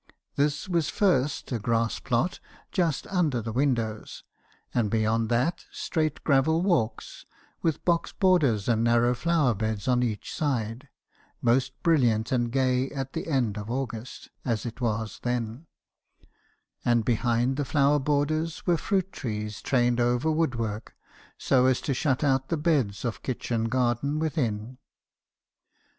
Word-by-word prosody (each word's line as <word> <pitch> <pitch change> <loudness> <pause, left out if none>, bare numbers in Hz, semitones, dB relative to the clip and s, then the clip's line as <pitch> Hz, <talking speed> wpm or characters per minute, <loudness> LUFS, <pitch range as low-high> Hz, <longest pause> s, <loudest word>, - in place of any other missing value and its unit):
This 145 +4 0
was 170 -4 0
first, 150 -9 +1
a 120 - -1
grass 115 +1 0
plot, 130 +7 0 0.3
just 170 -6 0
under 165 -10 0
the 115 0 -4
windows, 115 -4 -1 0.5
and 115 -4 +1
beyond 110 +1 +1
that, 125 +9 0
straight 155 -2 -2
gravel 160 +4 +3
walks, 120 - -1 0.4
with 160 -3 -1
box 170 -1 +1
borders 150 - +2
and 115 -2 +2
narrow 120 +1 +3
flower 155 -1 +2
beds 110 0 -3
on 125 -1 +3
each 110 -4 -3
side, 125 -2 -2 0.5
most 120 +2 +2
brilliant 120 -9 +2
and 120 -2 +1
gay 130 0 +1
at 135 -1 -5
the - - -4
end 120 -9 0
of 105 +1 -7
August, 125 -2 -5
as 115 -3 -1
it 120 +2 -6
was 110 -3 -2
then; 120 +4 -3 1.2
and 120 -2 +2
behind 120 +2 +1
the 145 - -1
flower 140 0 +3
borders 150 +3 -1
were 175 -2 +3
fruit 190 +2 -1
trees 105 -1 -5
trained 120 -2 +2
over 120 +5 +2
wood 155 -5 +1
work, 110 -1 -4 0.4
so 130 -1 +3
as 130 -1 +3
to 140 - -1
shut 135 +1 0
out 135 -2 +1
the 165 - 0
beds 140 - 0
of 115 - -3
kitchen 120 -3 -2
garden 125 +4 0
within. 125 -7 -2
125 Hz, 145 wpm, -27 LUFS, 115-150 Hz, 1.2 s, gravel